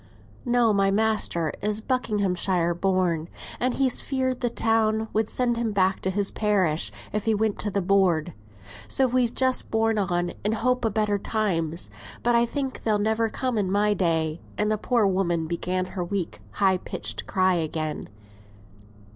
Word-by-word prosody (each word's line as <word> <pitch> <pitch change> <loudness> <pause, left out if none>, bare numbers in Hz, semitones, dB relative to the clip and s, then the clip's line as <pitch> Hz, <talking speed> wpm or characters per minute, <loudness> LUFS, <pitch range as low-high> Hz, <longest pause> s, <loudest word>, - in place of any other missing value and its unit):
_] - - -27 0.5
"No; 240 -3 +4
my 195 -1 +3
master 200 -6 +1
is 210 +1 0
Buckinghamshire 195 -7 0
born; 175 -3 0 0.3
and 250 0 0
he's 265 -2 +2
feared 260 -2 -1
the 245 - 0
town 220 -1 +1
would 220 0 +1
send 240 -2 0
him 230 -2 -1
back 190 -1 +2
to 190 - -1
his 200 +1 0
parish, 185 - +1 0.2
if 210 -1 -2
he 225 -1 +2
went 215 0 0
to 210 - -1
th' 200 -2 -2
board; 180 -4 +2 0.5
so 265 - +2
we've 250 -1 +1
just 260 -1 +1
borne 225 -1 +1
on 175 -3 0
in 210 +2 +1
hope 250 +3 0
o' - - +1
better 210 -1 0
times. 170 - -1 0.3
But 240 - +3
I 235 0 +4
think 270 +1 -3
they'll 215 -2 +1
never 220 +2 +1
come 250 -1 -1
in 190 -2 -1
my 210 +1 +3
day;" 165 -4 0 0.2
and 210 +1 +1
the 215 - +1
poor 235 -2 +2
woman 180 -4 +1
began 180 +2 -2
her 180 - -2
weak 180 -1 -3
high 190 -2 +2
pitched - - -4
cry 185 0 +2
again. 155 -2 -2
205 Hz, 170 wpm, -25 LUFS, 180-225 Hz, 0.5 s, No